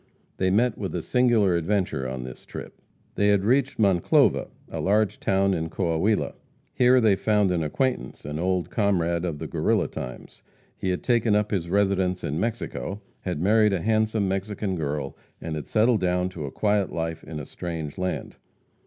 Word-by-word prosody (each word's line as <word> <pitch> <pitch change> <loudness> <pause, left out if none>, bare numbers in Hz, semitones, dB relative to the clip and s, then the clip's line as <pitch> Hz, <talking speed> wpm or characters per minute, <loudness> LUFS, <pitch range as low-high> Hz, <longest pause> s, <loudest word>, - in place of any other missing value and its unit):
They 95 - +1
met 110 +4 +2
with 95 -3 -3
a 85 - -2
singular 120 -7 +3
adventure 85 -6 0
on 65 -1 -5
this 65 -1 -9
trip. - - -9 0.3
They 100 - +2
had 100 -1 +3
reached 135 +3 +2
Monclova, 95 -5 +3 0.2
a - - -6
large 105 +2 +1
town 95 0 +2
in 80 -2 -2
Coahuila. 95 +5 0 0.4
Here 125 +1 +5
they 110 -4 +4
found 105 -1 +2
an 85 -2 0
acquaintance 125 - -2
an 75 +2 -4
old 90 0 0
comrade 85 -5 +1
of 80 -4 -3
the - - -6
Guerrilla - - +1
times. 65 0 -8 0.3
He 95 - -3
had 90 - -2
taken 115 -3 +2
up 105 0 +1
his 90 -5 -1
residence 95 -2 +1
in 75 +3 -2
Mexico, 100 - -3 0.2
had 90 -5 -3
married 105 +1 +4
a 90 - 0
handsome 110 -1 +1
Mexican 95 0 -2
girl, 75 -3 -3 0.2
and 80 -1 -4
had 75 - -5
settled 110 +1 +3
down 90 0 +1
to 80 -5 -6
a 70 - -6
quiet 105 -2 +1
life 80 0 -3
in 80 -2 -6
a 75 - -6
strange 80 -2 -6
land. 90 0 -3
95 Hz, 180 wpm, -25 LUFS, 85-105 Hz, 0.4 s, Here